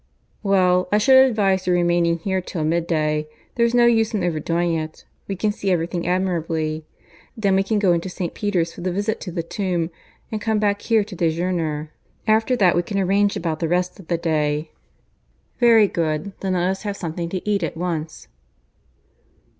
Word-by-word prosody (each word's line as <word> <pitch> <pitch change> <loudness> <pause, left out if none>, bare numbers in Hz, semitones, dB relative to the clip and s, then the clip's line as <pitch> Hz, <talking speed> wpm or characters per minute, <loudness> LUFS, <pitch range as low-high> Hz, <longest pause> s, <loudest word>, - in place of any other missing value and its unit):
"Well, 185 -3 +3
I 210 - +4
should 260 +5 +7
advise 195 -5 +1
your 180 - +3
remaining 175 -1 +2
here 190 +2 -1
till 175 -2 -4
mid 165 +2 0
day. 155 -2 0 0.3
There's 235 0 +2
no 240 -1 +6
use 225 -1 +3
in 195 - -1
overdoing 170 +1 0
it. 155 -1 -5 0.2
We 195 - -3
can 210 +3 0
see 200 -1 -3
everything 170 -1 -1
admirably. 165 -4 -1 0.5
Then 200 -3 +2
we 190 - +4
can 210 +2 0
go 195 -4 +3
into 170 +2 -2
St. 180 -1 -4
Peter's 180 -5 -1
for - - -10
the 185 +1 -1
visit 205 +4 -2
to 180 - -6
the 170 0 -3
tomb, 175 -2 -2 0.4
and 215 -1 -3
come 220 0 0
back 205 -1 +1
here 225 -3 +2
to 200 -1 -10
dejeuner. 165 -2 -1 0.3
After 220 +3 +3
that 190 -7 +3
we 175 - +3
can 200 +3 -4
arrange 200 +1 +2
about 160 -2 -2
the 165 - 0
rest 180 +3 -1
of 180 - -13
the 170 - 0
day." 155 -2 -1 0.9
"Very 230 -4 +6
good. 165 +2 -2
Then 190 -1 -1
let 180 0 +1
us 190 +1 -2
have 205 -2 -4
something 170 0 -4
to 185 +3 -5
eat 205 -2 +1
at 165 -1 -3
once." 165 -3 -4
180 Hz, 190 wpm, -22 LUFS, 165-200 Hz, 0.9 s, should